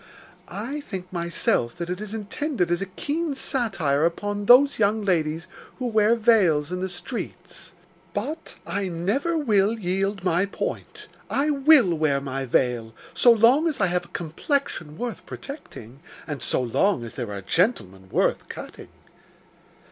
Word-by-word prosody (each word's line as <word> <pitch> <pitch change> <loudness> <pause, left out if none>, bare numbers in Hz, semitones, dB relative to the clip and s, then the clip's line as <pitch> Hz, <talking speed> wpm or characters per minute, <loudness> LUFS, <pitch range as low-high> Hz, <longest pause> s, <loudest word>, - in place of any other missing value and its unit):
I 240 +9 -5
think, 190 -9 -7
myself, 170 -8 0
that 170 -1 -5
it 180 +3 -4
is 215 +1 -5
intended 220 - -2
as 175 - +1
a 195 - -2
keen 295 - -3
satire 195 - 0
upon 205 +5 -1
those 275 +2 +7
young 210 0 +2
ladies 165 -3 0 0.3
who 255 - -4
wear 220 -1 +3
veils 190 -10 +3
in 180 - -2
the 190 +1 -2
streets; 195 +7 -7 0.4
but 295 +11 -5
I 200 -1 -2
never 205 - -1
will 220 -6 +2
yield 195 0 -1
my 180 +1 +2
point. - - -5 0.2
I 290 +2 +1
will 275 - +5
wear 155 -3 +1
my 135 -1 -4
veil, 120 -3 0 0.2
so 240 - +6
long 240 +8 +5
as 310 - -1
I 195 - +4
have 180 - 0
a - - -6
complexion 170 - -2
worth 230 -6 -4
protecting, 140 - -9 0.3
and 145 -5 -5
so - - +1
long 125 - +1
as 115 - -8
there 120 -5 -5
are 100 -1 -5
gentlemen 95 - 0
worth - - 0
cutting. - - -9
195 Hz, 155 wpm, -24 LUFS, 160-240 Hz, 0.4 s, those